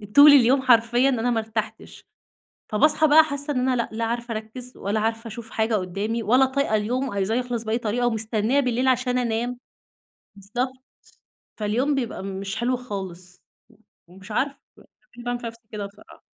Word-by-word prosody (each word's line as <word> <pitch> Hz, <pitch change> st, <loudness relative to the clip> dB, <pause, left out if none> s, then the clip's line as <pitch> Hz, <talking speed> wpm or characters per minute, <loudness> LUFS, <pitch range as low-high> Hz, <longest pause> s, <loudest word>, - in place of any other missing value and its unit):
طول 290 Hz, +1 st, +10 dB
اليوم 265 Hz, 0 st, +5 dB
حرفيًا 240 Hz, +1 st, +4 dB
أنا 245 Hz, -2 st, 0 dB
ما 230 Hz, -, +1 dB
ارتحتش. 220 Hz, -1 st, -6 dB, 0.6 s
فباصحي 300 Hz, +8 st, +3 dB
بقى 310 Hz, +2 st, +7 dB
حاسة 285 Hz, -1 st, -3 dB
إن 265 Hz, -, -1 dB
أنا 255 Hz, -, +2 dB
لأ، 235 Hz, -, -1 dB
لا 225 Hz, +1 st, -2 dB
عارفة 235 Hz, +1 st, -3 dB
أركز 235 Hz, +4 st, -7 dB
ولا 205 Hz, +2 st, -2 dB
عارفة 225 Hz, +1 st, -2 dB
أشوف 225 Hz, +1 st, -9 dB
حاجة 220 Hz, 0 st, 0 dB
قدَّامي 205 Hz, +4 st, -2 dB
ولا 250 Hz, +5 st, +4 dB
طايقة 265 Hz, -3 st, -1 dB
اليوم، 250 Hz, +5 st, -1 dB
عايزاه 200 Hz, +1 st, -1 dB
يخلص 245 Hz, -2 st, -2 dB
بأي 220 Hz, +1 st, 0 dB
طريقة 240 Hz, +1 st, -1 dB
ومستنية 225 Hz, +3 st, +1 dB
بالليل 250 Hz, 0 st, 0 dB
عشان 250 Hz, -1 st, +1 dB
أنام. 240 Hz, +1 st, -1 dB, 0.8 s
بالضبط، 240 Hz, +7 st, -3 dB, 0.8 s
فاليوم 235 Hz, +7 st, 0 dB
بيبقى 245 Hz, -7 st, -3 dB
مش 195 Hz, 0 st, -5 dB
حلو 250 Hz, +1 st, 0 dB
خالص. 185 Hz, -6 st, -8 dB, 0.6 s
ومش 190 Hz, +4 st, -13 dB
عارفة 275 Hz, +6 st, -1 dB, 0.6 s
ليه 240 Hz, -, -9 dB
باعمل 245 Hz, 0 st, -2 dB
في 235 Hz, -, -5 dB
نفسي 230 Hz, 0 st, -10 dB
كده 210 Hz, -2 st, -4 dB
بصراحة! 200 Hz, +1 st, -15 dB
235 Hz, 165 wpm, -24 LUFS, 215-255 Hz, 0.8 s, طول